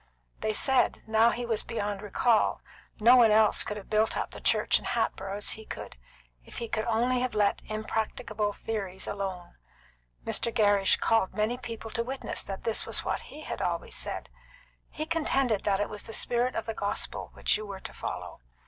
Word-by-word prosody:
They 215 Hz, -, 0 dB
said, 260 Hz, +4 st, +2 dB
now 220 Hz, +1 st, +5 dB
that -, -, -1 dB
he 245 Hz, -, -3 dB
was 225 Hz, -2 st, 0 dB
beyond 205 Hz, -3 st, -3 dB
recall, 215 Hz, +2 st, +2 dB, 0.4 s
no 235 Hz, +4 st, +8 dB
one 235 Hz, -2 st, +7 dB
else 215 Hz, 0 st, +5 dB
could 210 Hz, -, -2 dB
have 200 Hz, -, -9 dB
built 215 Hz, +1 st, +2 dB
up -, -, -2 dB
the -, -, -9 dB
church -, -, +3 dB
in -, -, -12 dB
Hatboro' 195 Hz, +1 st, -1 dB
as 205 Hz, -, -1 dB
he 220 Hz, -, -6 dB
could, -, -, -7 dB, 0.5 s
if -, -, -12 dB
he 235 Hz, -, -3 dB
could 215 Hz, 0 st, -1 dB
only 240 Hz, +2 st, +2 dB
have 255 Hz, -2 st, -1 dB
let 205 Hz, -1 st, +2 dB
impracticable 215 Hz, -1 st, -2 dB
theories 195 Hz, -3 st, -4 dB
alone. 190 Hz, -3 st, -5 dB, 0.7 s
Mr. 235 Hz, -, +1 dB
Gerrish 205 Hz, -3 st, +4 dB
called 225 Hz, -4 st, +2 dB
many 215 Hz, +3 st, +1 dB
people 230 Hz, -3 st, -7 dB
to 230 Hz, -, -1 dB
witness 265 Hz, +2 st, -4 dB
that 195 Hz, -1 st, -6 dB
this 225 Hz, -, 0 dB
was -, -, -2 dB
what -, -, -1 dB
he 305 Hz, -, -9 dB
had -, -, -5 dB
always -, -, -2 dB
said. -, -, -4 dB, 0.6 s
He 310 Hz, -, -4 dB
contended 275 Hz, -9 st, +1 dB
that 195 Hz, -1 st, +2 dB
it 205 Hz, -, +1 dB
was 210 Hz, -, -6 dB
the 225 Hz, -, -8 dB
spirit 245 Hz, +3 st, +1 dB
of 225 Hz, -, -2 dB
the 225 Hz, -, -3 dB
gospel 200 Hz, -1 st, -2 dB
which -, -, +2 dB
you 215 Hz, 0 st, -4 dB
were 195 Hz, -1 st, -6 dB
to -, -, -8 dB
follow. -, -, -6 dB
220 Hz, 195 wpm, -29 LUFS, 205-235 Hz, 0.7 s, no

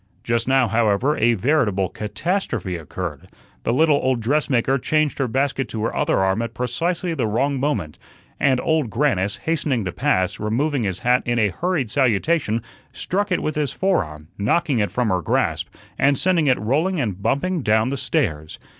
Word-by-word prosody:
Just 115 Hz, 0 st, 0 dB
now, 130 Hz, -2 st, +3 dB
however, 115 Hz, +6 st, +2 dB
a 120 Hz, +1 st, +4 dB
veritable 110 Hz, -5 st, +1 dB
catastrophe 110 Hz, -, -3 dB
occurred. 85 Hz, -2 st, -6 dB, 0.3 s
The -, -, -1 dB
little 150 Hz, +3 st, +4 dB
old 130 Hz, -3 st, 0 dB
dressmaker 135 Hz, +1 st, +1 dB
changed 155 Hz, +2 st, 0 dB
her 135 Hz, -, +1 dB
basket 135 Hz, +2 st, -1 dB
to 110 Hz, -1 st, -4 dB
her 115 Hz, -, -2 dB
other -, -, +1 dB
arm 95 Hz, +3 st, +1 dB
at 115 Hz, -, -5 dB
precisely 170 Hz, +8 st, -1 dB
the 130 Hz, -8 st, -1 dB
wrong 135 Hz, +6 st, 0 dB
moment, 135 Hz, -, -2 dB, 0.4 s
and 130 Hz, -3 st, +3 dB
Old 160 Hz, -7 st, +1 dB
Grannis, 105 Hz, -6 st, 0 dB
hastening 145 Hz, -8 st, 0 dB
to 90 Hz, -, -2 dB
pass, 95 Hz, +3 st, 0 dB
removing 130 Hz, +7 st, 0 dB
his 95 Hz, -4 st, -2 dB
hat 125 Hz, +2 st, +2 dB
in 120 Hz, 0 st, +1 dB
a 105 Hz, -3 st, +3 dB
hurried 160 Hz, -, -2 dB
salutation, 125 Hz, -, +1 dB, 0.3 s
struck 200 Hz, +2 st, -2 dB
it 180 Hz, -, +1 dB
with 155 Hz, -, -1 dB
his 150 Hz, -3 st, -1 dB
fore 190 Hz, -1 st, +1 dB
arm, 75 Hz, 0 st, -12 dB
knocking 125 Hz, +4 st, +1 dB
it 105 Hz, -, +1 dB
from 125 Hz, -3 st, 0 dB
her 90 Hz, -2 st, +1 dB
grasp, -, -, 0 dB, 0.3 s
and 140 Hz, 0 st, +3 dB
sending 175 Hz, -4 st, +2 dB
it 130 Hz, -, +4 dB
rolling 155 Hz, -, 0 dB
and 100 Hz, -8 st, -2 dB
bumping 170 Hz, -, 0 dB
down 110 Hz, 0 st, +2 dB
the 140 Hz, -, -2 dB
stairs. 80 Hz, -, -2 dB
125 Hz, 180 wpm, -22 LUFS, 105-150 Hz, 0.4 s, a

